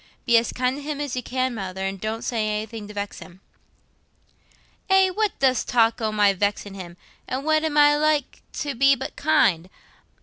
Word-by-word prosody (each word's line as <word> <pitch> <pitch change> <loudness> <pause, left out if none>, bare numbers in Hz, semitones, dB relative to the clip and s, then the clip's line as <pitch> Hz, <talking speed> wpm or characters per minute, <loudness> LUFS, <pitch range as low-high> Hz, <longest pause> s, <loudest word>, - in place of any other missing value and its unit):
Be 235 - +3
as 230 - -4
kind 255 +2 -1
to - - -7
him 290 0 -5
as 285 -3 -3
you 250 - -2
can, 255 +1 -2
Mother, 190 -3 -5
and 195 -1 -4
don't 220 +1 -3
say 225 -3 -1
anything 215 0 -4
to 210 - -10
vex 205 0 -5
him." 180 +1 -13 1.5
"Eh, 385 -1 +4
what 425 +1 -1
dost 260 -3 +1
talk 230 -1 +2
o' 220 -1 0
my 205 -2 +3
vexin' 205 +1 -2
him? 180 -3 -9 0.3
An' 260 +2 -3
what 310 +1 +2
am 310 -2 -1
I 295 0 +6
like 300 -2 0
to 290 -2 -3
be 275 +2 +4
but 265 - -7
kind? 230 - +2
240 Hz, 195 wpm, -23 LUFS, 205-290 Hz, 1.5 s, I